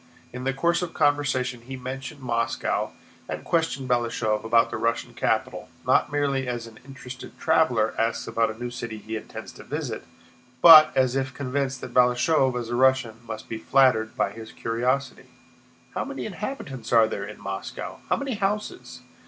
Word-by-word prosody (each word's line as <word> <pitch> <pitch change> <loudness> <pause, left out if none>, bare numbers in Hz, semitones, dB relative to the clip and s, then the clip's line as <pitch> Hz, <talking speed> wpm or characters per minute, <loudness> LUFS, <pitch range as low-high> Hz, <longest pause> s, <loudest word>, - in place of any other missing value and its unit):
In 125 +1 -6
the 135 - +2
course 170 +7 +1
of 175 -2 -5
conversation 135 -5 +1
he 130 +3 -8
mentioned 135 +3 -7
Moscow 115 -2 -1 0.4
and - - -4
questioned 160 -5 0
Balashëv 115 -3 0
about 115 +1 +3
the - - -2
Russian 115 0 -1
capital, - - -1 0.2
not - - +3
merely 140 -2 0
as 120 -1 -3
an 115 -1 -13
interested 130 -1 -10
traveler 160 -9 +2
asks 115 0 0
about 115 -1 +1
a 110 - -6
new 120 +1 -5
city 120 -2 -6
he 110 +2 -6
intends 110 - -7
to - - -13
visit, - - -4 0.5
but 155 0 +10
as 130 -1 +3
if 135 -1 -2
convinced 135 -1 -2
that - - -8
Balashëv, 125 +1 +3
as 115 -1 -6
a 120 - -1
Russian, 130 -3 +2
must 110 -1 -6
be 110 - -5
flattered 115 -3 +3
by 95 +2 +1
his 110 +1 -10
curiosity. 125 +4 -2 0.7
"How - - -1
many - - -5
inhabitants 135 - -6
are 115 -2 +6
there 100 - -4
in 105 +1 -8
Moscow? 95 0 -6
How - - +3
many 275 -2 -3
houses? 210 - -3
125 Hz, 170 wpm, -25 LUFS, 115-140 Hz, 0.7 s, but